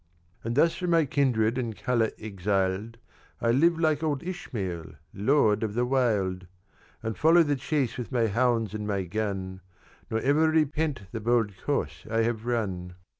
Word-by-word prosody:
"And 115 +1 -2
thus 165 +4 +4
from 180 -1 -3
my 165 -2 +4
kindred 125 -4 +1
and 115 -4 -3
colour 115 -3 +1
exiled, 100 +1 -2 0.4
I 115 - +2
live 165 +7 +4
like 155 -2 +2
old 150 -4 -1
Ismael 95 - -5 0.2
lord 110 0 +3
of 110 -2 -2
the 120 +1 +2
wild 105 -8 0 0.6
And 110 -1 -2
follow 165 +2 +5
the 145 -2 +1
chase 135 -2 -1
with 120 - -5
my 120 -3 +2
hounds 115 -1 +1
and 105 -1 -4
my 100 -2 -1
gun, 95 -1 -3 0.5
Nor 110 - 0
ever 150 +4 +3
repent 155 -4 0
the 115 - -4
bold 115 -1 +1
course - - -2
I 115 0 +1
have 115 0 -2
run. 95 -7 -2
115 Hz, 165 wpm, -27 LUFS, 105-140 Hz, 0.6 s, follow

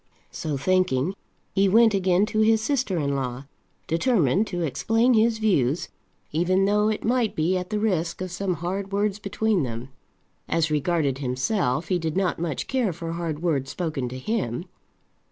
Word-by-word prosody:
So 150 -3 -3
thinking, 185 -1 +1 0.4
he 195 0 +3
went 225 +2 +5
again 190 0 +3
to 215 - -2
his 220 0 +4
sister 240 -6 0
in 140 -3 0
law, 130 0 -3 0.4
determined 185 - +2
to 175 -3 -3
explain 225 - +2
his 225 0 +3
views, 170 - +1 0.4
even 185 +5 +2
though 210 +1 +3
it 215 - -2
might 235 -1 +1
be 165 +4 +1
at 180 -1 -3
the 215 - -1
risk 180 -6 0
of 185 -1 -4
some 185 0 -1
hard 190 +4 -4
words 205 0 0
between 205 -1 0
them. 120 -1 -4 0.6
As 160 -1 +1
regarded 150 -3 0
himself, 130 - -1
he 180 -2 +2
did 160 0 -2
not 185 -4 0
much 160 -5 -2
care 250 -7 0
for 165 0 -6
hard 165 -2 -4
words 140 -6 0
spoken 155 -8 -3
to 130 - -6
him. 170 - -2
180 Hz, 170 wpm, -25 LUFS, 150-210 Hz, 0.6 s, went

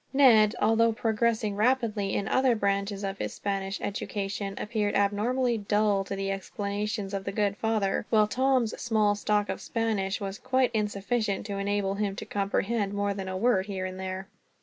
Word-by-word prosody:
Ned, 230 -6 +6
although 225 +2 +4
progressing 220 -2 0
rapidly 215 -3 +1
in 200 - -1
other 260 -2 +3
branches 200 -1 -1
of 195 0 -3
his - - -3
Spanish 195 -1 -3
education, 195 -1 -3
appeared 210 -2 -1
abnormally 230 +4 +1
dull 205 -1 +2
to 195 - -4
the 195 0 -2
explanations 200 +1 -3
of 195 -1 -2
the 195 - -3
good 200 -1 0
father; 215 -2 0
while 215 -2 +4
Tom's 255 -1 +1
small 215 -3 +2
stock 205 0 0
of - - -4
Spanish 210 -4 -1
was 195 -1 -5
quite 255 -1 +1
insufficient 210 0 -1
to 200 -2 -4
enable 200 -1 0
him 200 -1 -2
to - - -6
comprehend 200 +1 -1
more 200 0 0
than 195 -1 -5
a 185 0 -3
word, 195 -2 +2
here 190 -2 -3
and 185 0 -6
there. 190 0 -5
205 Hz, 170 wpm, -28 LUFS, 195-225 Hz, -, Ned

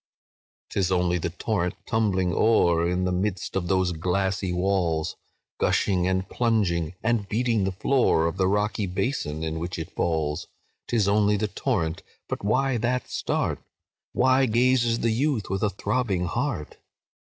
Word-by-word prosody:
"'Tis 95 -2 0
only 90 -1 +2
the 85 - -2
torrent 90 0 -2
tumbling 95 -5 +1
o'er, 85 -6 +3
In 90 +1 0
the 90 - 0
midst 95 +1 -2
of 90 -2 -1
those 95 -1 +2
glassy 95 +3 -1
walls, 90 -3 0 0.4
Gushing, 90 -3 +2
and 95 0 0
plunging, 90 -9 0
and 115 -3 0
beating 115 -2 +1
the 95 - 0
floor 95 -4 +2
Of 85 +2 -2
the 95 -1 +2
rocky 105 0 0
basin 90 - -2
in 80 0 -3
which 90 +3 -4
it 80 -1 -6
falls: 80 -3 -1 0.4
'Tis 110 -5 +1
only 105 0 +3
the 105 +1 -1
torrent—but 85 -12 -3
why 130 +5 +1
that 125 +3 -1
start? - - -1 0.5
Why 130 +1 +3
gazes 120 0 +2
the 115 - +2
youth 120 -4 0
with 95 0 -1
a 105 - +2
throbbing 100 -2 -1
heart? 75 -2 -3
95 Hz, 150 wpm, -25 LUFS, 90-110 Hz, 0.5 s, o'er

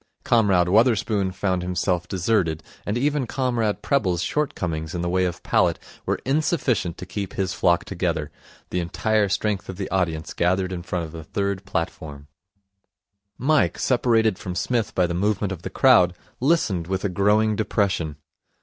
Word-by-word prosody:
Comrade 100 -7 +3
Wotherspoon 105 -2 +2
found 95 -1 -1
himself 90 0 -1
deserted, 90 -4 0 0.2
and 105 +3 0
even 145 0 0
Comrade 120 -6 -1
Prebble's 95 - +1
shortcomings 85 - -2
in 85 - -2
the 85 - -1
way 90 +1 +2
of 85 -1 -4
palate - - +2 0.3
were - - +1
insufficient 135 - 0
to - - -7
keep 95 +1 -5
his 95 -1 -1
flock 85 -3 +2
together. - - -2 0.4
The 90 - 0
entire 105 +4 +1
strength 100 0 -1
of 95 - -6
the 100 - -3
audience 85 -4 -1
gathered 95 +2 +1
in 90 - -4
front 85 -1 -3
of 80 - -10
the 80 -1 -8
third 100 +3 -2
platform. 75 -5 -4 1.1
Mike, 155 +4 +2
separated 115 -5 +2
from 90 -1 -5
Psmith 120 +2 -1
by 90 - +3
the 85 - -2
movement 100 +2 0
of 90 -3 -5
the - - -5
crowd, 100 -10 +5 0.2
listened 120 - +1
with 95 +1 -2
a - - +4
growing 105 +3 +2
depression. 100 -7 0
95 Hz, 160 wpm, -23 LUFS, 90-110 Hz, 1.1 s, crowd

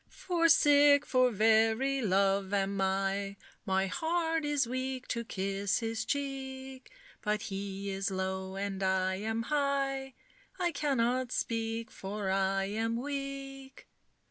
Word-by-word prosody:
For 335 -2 +1
sick 290 -2 +6
for 255 -1 +3
very 225 +5 +3
love 195 -1 +2
am 195 0 0
I, 195 +1 0 0.3
My 190 0 +2
heart 325 - 0
is 290 -2 +1
weak 255 +1 -3
to 235 -1 -1
kiss 195 -2 -1
his 225 -1 -2
cheek; 265 -2 -4 0.3
But 210 -1 -1
he 195 0 -4
is 195 +1 -1
low, 190 0 -3
and 195 0 -3
I 190 0 +1
am 220 +3 -2
high, 275 -1 -1 0.4
I 350 -1 +1
cannot 255 -4 0
speak, 225 -1 -2
for 195 0 -4
I 195 0 +1
am 225 +3 -1
weak." 275 0 -6
225 Hz, 125 wpm, -31 LUFS, 195-270 Hz, 0.4 s, sick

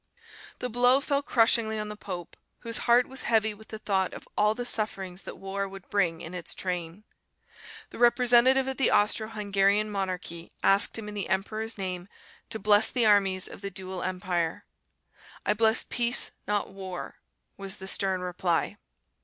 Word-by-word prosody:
The 250 - -3
blow 245 +3 +4
fell 280 0 0
crushingly 230 -4 +2
on 210 0 -4
the 210 - -6
pope, 180 -5 -7 0.3
whose 230 +1 -4
heart 245 +1 +5
was 265 0 -1
heavy 220 -2 +2
with 220 +1 -15
the 220 - -7
thought 190 -3 -1
of - - -11
all 210 +1 +2
the 245 - -4
sufferings 195 -5 -2
that - - -9
war 195 0 -4
would 195 -1 -11
bring 170 -5 +1
in 165 - -8
its 180 -2 -5
train. 180 +1 -4 0.9
The - - -10
representative 245 +2 +5
of 265 - -3
the 270 - +3
Austro 215 +1 +2
Hungarian 205 -1 +1
monarchy 180 -4 -4
asked 195 +4 +7
him 220 -2 -7
in 210 - -7
the 200 -3 -4
emperor's 215 +4 -2
name 185 -2 -4 0.4
to - - -2
bless 210 +1 +4
the 245 -3 +1
armies 195 -3 +3
of - - -11
the 200 - -4
dual 185 -1 -6
empire. 180 -3 -2 0.8
"I - - +3
bless 220 +2 +2
peace, 240 0 +2 0.2
not 205 -1 -1
war," 190 -2 -7 0.4
was 195 0 -5
the 190 - -9
stern 190 -2 0
reply. 180 +1 -1
205 Hz, 170 wpm, -27 LUFS, 185-225 Hz, 0.9 s, asked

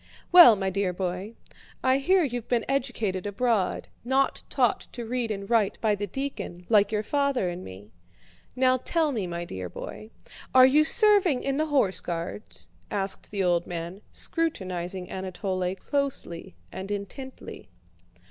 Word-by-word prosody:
"Well, 345 -11 +10
my 195 -1 -2
dear 195 -1 -1
boy, 185 +4 -4 0.5
I 260 +1 +3
hear 370 +6 +3
you've 245 -5 -3
been 240 -2 0
educated 225 -8 -1
abroad, 205 -2 0 0.2
not 265 +3 +1
taught - - +1
to 240 - -6
read 240 0 -2
and 200 -2 -4
write 225 -3 +1
by 220 -2 +2
the 205 0 -3
deacon, 200 -7 -5
like 210 -2 +4
your 210 -1 0
father 280 -6 0
and 175 +1 -6
me. 95 +3 -11 0.6
Now 255 0 +3
tell 315 +4 0
me, 215 -8 -2
my 170 0 -4
dear 95 - -6
boy, 215 - -8 0.5
are 255 0 +9
you 290 +4 +5
serving 390 - +4
in 275 0 -1
the 310 +1 0
Horse 265 -11 +2
Guards?" 170 +4 -5 0.2
asked 195 -2 -2
the 200 -2 -1
old 175 -1 +1
man, 175 +3 -6
scrutinizing 185 - -3
Anatole 185 0 -3
closely 250 - -3 0.2
and 190 +1 -7
intently. 205 - -7
210 Hz, 150 wpm, -26 LUFS, 185-265 Hz, 0.6 s, Well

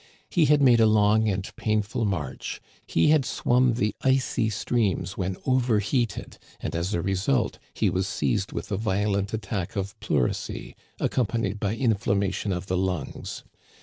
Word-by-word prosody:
He 170 -3 +4
had 145 0 +4
made 120 -3 +6
a 110 - +6
long 110 +1 +4
and 95 -1 -2
painful 110 +1 0
march, 75 -10 -3 0.3
he 80 - +3
had 155 -2 +5
swum 125 0 +2
the 105 -3 0
icy 130 -4 +2
streams 100 -3 -1
when 95 -1 -2
overheated, 120 -3 0 0.2
and - - -4
as 85 +5 -1
a 85 - -1
re 95 +1 0
sult 115 +5 0 0.2
he - - +2
was 95 +1 0
seized 105 -1 -1
with 105 - -5
a 100 - 0
violent 100 -1 0
attack 110 -3 -3
of 100 -1 -2
pleurisy, 65 - -2 0.2
ac - - +1
companied 115 -4 -1
by 105 +1 -1
inflammation 100 -4 0
of 90 0 -2
the 90 -1 -1
lungs. 90 -5 -3
105 Hz, 160 wpm, -26 LUFS, 95-115 Hz, 0.3 s, made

